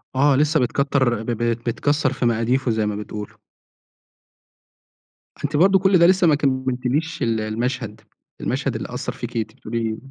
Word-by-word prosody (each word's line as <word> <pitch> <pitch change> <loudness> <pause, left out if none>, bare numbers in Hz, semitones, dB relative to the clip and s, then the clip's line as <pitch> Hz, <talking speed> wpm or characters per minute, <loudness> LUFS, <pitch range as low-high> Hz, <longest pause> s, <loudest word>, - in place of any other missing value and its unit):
آه 140 +1 +4
لسه 150 +2 +3
بتكَتَّر 130 -2 +1
ب - - -10
ب 115 - -2
بتكَسَّر 125 +5 0
في 130 - -2
مقاديفه 120 +2 +1
زي 110 -1 0
ما 105 -1 -2
بتقولوا. 105 0 -7 2.1
أنتِ 145 +1 -2
برضه 190 +3 +5
كل 190 0 +4
ده 170 - +6
لسه 185 -2 +4
ما 150 - +5
كمَّلتِليش 130 +3 -1
ال 115 -1 +1
المشهد، 110 0 -3 0.4
المشهد - - -1
اللي - - -4
أثَّر - - -3
فيكِ، - - -6
أنتِ 110 -1 -2
بقولي 110 -1 -2
125 Hz, 155 wpm, -22 LUFS, 115-145 Hz, 2.1 s, ده